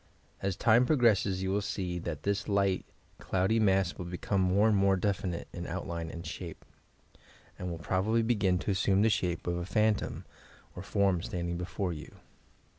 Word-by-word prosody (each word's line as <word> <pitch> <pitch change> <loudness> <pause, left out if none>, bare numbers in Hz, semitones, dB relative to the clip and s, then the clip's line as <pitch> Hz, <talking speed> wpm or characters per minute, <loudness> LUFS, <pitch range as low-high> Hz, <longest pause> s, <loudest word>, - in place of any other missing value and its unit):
As 95 -2 -1
time 120 +4 +4
progresses 105 -9 +3
you 95 - -1
will 100 +1 +1
see 90 -3 -3
that 85 -3 -5
this 100 0 -1
light, 100 -2 +1 0.3
cloudy 95 +5 +1
mass 95 -4 +3
will 90 - -6
become 90 +3 -1
more 95 +4 +3
and 110 - +3
more 100 0 +4
definite 95 -2 -2
in - - -5
outline 85 -1 -4
and 85 +1 -8
shape. - - -7
YOUR - - -30
PSYCHIC - - -33
POWERS - - -27
and 90 - -4
will 85 - -4
probably 110 +6 +1
begin 100 -6 +2
to 95 +3 -2
assume 95 +1 +2
the 110 - +4
shape 90 -4 -1
of 85 0 -1
a 85 - -3
phan 110 +3 +3
tom 105 - -5 0.5
or 90 - -6
form 100 -3 +1
standing 85 -1 -3
before 90 +1 -3
you. 75 - -10
95 Hz, 190 wpm, -30 LUFS, 90-100 Hz, 0.5 s, time